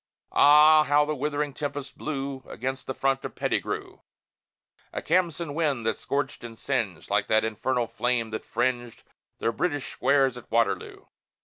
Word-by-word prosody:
Ah, 150 +2 +7
how 145 +1 +4
the 155 - -1
withering 145 +1 -2
tempest 145 -1 -5
blew 135 -3 -4
Against 130 +1 -5
the 130 - -3
front 135 0 0
of - - -6
Pettigrew! - - -2 0.9
A - - -3
Khamsin 170 -3 0
wind 145 -7 0
that 110 -1 +1
scorched 140 -2 -3
and 115 -1 -9
singed, 110 - -3
Like 100 0 +2
that 110 0 +3
infernal 120 +3 -1
flame 115 0 -1
that 110 - -4
fringed 120 -2 -2 0.3
The 115 - 0
British 145 +2 -2
squares 135 -3 +2
at 125 - -12
Waterloo! 115 +1 0
135 Hz, 150 wpm, -26 LUFS, 115-145 Hz, 0.9 s, Ah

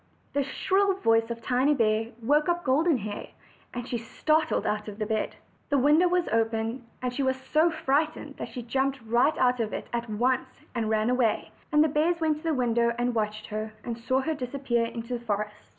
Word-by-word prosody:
The 285 - +2
shrill 385 +8 +1
voice 225 -10 +2
of 230 0 -5
Tiny 260 +4 +2
bear 220 -2 +2 0.2
woke 295 +7 +3
up 345 0 0
Golden 295 +3 +3
Hair, 205 -2 -5 0.4
and 245 0 -5
she 240 - -2
started 310 +7 0
out 210 0 -1
of 205 -1 -7
bed. 220 0 -1 0.3
The 285 - +3
window 300 +6 +5
was 355 0 +1
open, 225 +2 0 0.2
and 250 -1 -1
she 275 - -2
was 260 -1 +1
so 310 +5 +2
frightened 305 -1 -1
that - - -5
she 245 - -6
jumped 265 +3 0
right 235 +7 +2
out 250 -1 +3
of 220 -2 -1
it - - -4
at 235 -1 -2
once, 255 +4 -1
and 230 -3 -1
ran 220 +2 +2
away; 250 -3 +1 0.2
and 300 0 +5
the - - +3
bears 315 +4 +1
went 315 -2 +1
to 305 - -13
the 325 - +1
window 235 -2 +2
and 245 0 0
watched 215 -1 -2
her, 215 +1 -4
and 235 - -3
saw 255 +3 0
her 320 +4 -1
disappear 250 -3 -1
in 230 0 -5
the 240 +1 -4
forest. 210 -2 -2
250 Hz, 205 wpm, -27 LUFS, 225-295 Hz, 0.4 s, window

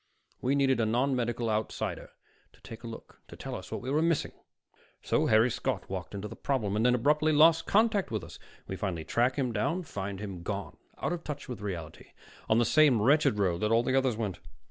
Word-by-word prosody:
We 135 +3 +1
needed 135 -3 +2
a 115 - +2
nonmedical 120 -1 0
outsider 110 0 -2 0.4
to - - -24
take 115 0 -10
a - - -6
look, 115 - -11
to - - -11
tell - - -7
us - - -7
what - - -4
we 130 - -4
were 150 +2 +2
missing. 165 -1 +1 0.7
So - - +1
Harry 110 +3 +4
Scott - - -2
walked - - -5
into 100 +1 -4
the - - -9
problem, 110 -8 -1
and 110 - +1
then 125 0 +4
abruptly 150 +5 +2
lost 160 +2 +5
contact 215 -2 +2
with 110 -5 -3
us. - - -11 0.3
We 95 - -4
finally 90 -4 -3
track 125 +2 +1
him 130 -4 -1
down 105 +9 0
and 180 -2 -5
find 100 0 -5
him 100 -4 -6
gone, 100 +2 -5 0.2
out - - -2
of 170 -1 -5
touch 145 -1 -6
with 125 -5 -6
reality, 85 -6 -7 0.4
on 110 - +4
the 120 - +4
same 150 -5 +5
wretched 135 0 +3
road 90 -4 +1
that 105 - +1
all 115 +1 +4
the 130 +2 0
others 130 -4 +2
went. 105 -5 -3
120 Hz, 220 wpm, -29 LUFS, 105-140 Hz, 0.7 s, lost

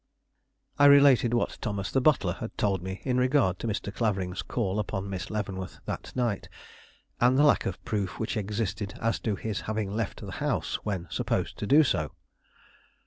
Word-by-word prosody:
I 145 - +7
related 140 -4 +6
what 120 - -1
Thomas 100 -3 -3
the 135 - +2
butler 150 +1 +3
had - - -6
told 100 -3 +1
me 95 +1 -6
in 125 -1 +1
regard 125 -8 +2
to - - -3
Mr. 105 -1 -3
Clavering's 95 -5 -1
call 105 -4 -2
upon 100 -1 -3
Miss 95 -1 -4
Leavenworth 100 -3 -4
that - - -5
night, 120 -6 -1 0.7
and 125 +2 +4
the 145 - +5
lack 145 - +4
of 95 - -6
proof 100 -4 -2
which 110 - -2
existed 105 -1 -3
as 115 0 0
to 110 -3 -1
his 105 -1 -3
having 110 -2 -2
left 110 -1 -3
the - - -7
house - - -1
when 95 -5 -3
supposed - - -1
to 105 - -3
do 150 +6 +7
so. 75 - -1
105 Hz, 180 wpm, -28 LUFS, 95-120 Hz, 0.7 s, I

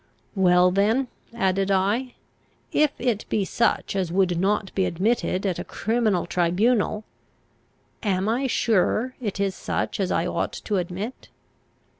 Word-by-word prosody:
Well 180 -2 +4
then, 220 +7 +2 0.2
added 195 -3 0
I, 205 +7 +1 0.6
if 305 0 +4
it 235 -4 0
be 205 -3 +1
such 230 -1 0
as 185 -3 -1
would 180 -2 +2
not 195 +1 0
be 190 - +1
admitted 190 +1 0
at 185 -3 -1
a - - -3
criminal 220 -5 0
tribunal, 205 +6 +1 1.0
am 195 -2 0
I 245 +5 +1
sure 230 +2 +1
it 205 -4 -3
is 200 -1 +1
such - - -3
as - - 0
I - - +1
ought - - -2
to 210 - -2
admit? 185 +7 -5
200 Hz, 140 wpm, -24 LUFS, 185-230 Hz, 1.0 s, Well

